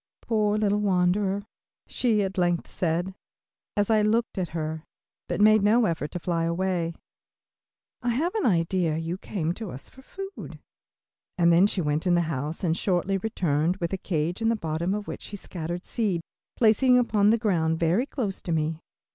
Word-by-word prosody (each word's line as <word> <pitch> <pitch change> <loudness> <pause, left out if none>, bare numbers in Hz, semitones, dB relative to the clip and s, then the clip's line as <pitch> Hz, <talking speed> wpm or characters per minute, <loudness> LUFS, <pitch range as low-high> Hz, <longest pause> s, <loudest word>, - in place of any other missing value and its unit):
"Poor 215 -2 +1
little 210 -1 +2
wanderer," 195 +1 +1 0.4
she 220 -5 +1
at 190 -1 -3
length 175 -2 +1
said, 175 +2 -1 0.6
as 205 +2 +2
I 215 -1 +4
looked 220 0 +1
at 180 - -1
her, 160 -1 -4 0.4
but - - -2
made 215 +1 +6
no 220 +3 +4
effort 165 -4 -1
to 175 - -3
fly 165 -1 -1
away, 170 -1 -1 1.1
"I 245 - -1
have 305 +10 0
an 435 - +1
idea 170 -3 +1
you 165 +3 -3
came 170 -6 -2
to 215 +1 -6
us 135 -2 -9
for 265 - -15
food," 390 +8 -8 0.8
and 170 -1 +5
then 180 +4 +6
she 200 - -1
went 150 +3 -1
into 175 - +4
the - - +3
house 155 0 -3
and 165 -2 +2
shortly 190 +1 0
returned 175 -5 0
with 170 -1 -3
a - - 0
cage 170 +3 -2
in 225 - +2
the 230 - +2
bottom 170 0 -2
of 210 -1 -5
which - - -6
she 205 - -7
scattered 175 -2 -5
seed, 200 -7 -1 0.3
placing 250 +3 +4
it - - +6
upon 210 -3 +3
the 230 - +4
ground 165 -8 +1
very 175 +11 +2
close 220 -10 -3
to 175 - -4
me. 160 0 0
185 Hz, 185 wpm, -26 LUFS, 165-215 Hz, 1.1 s, made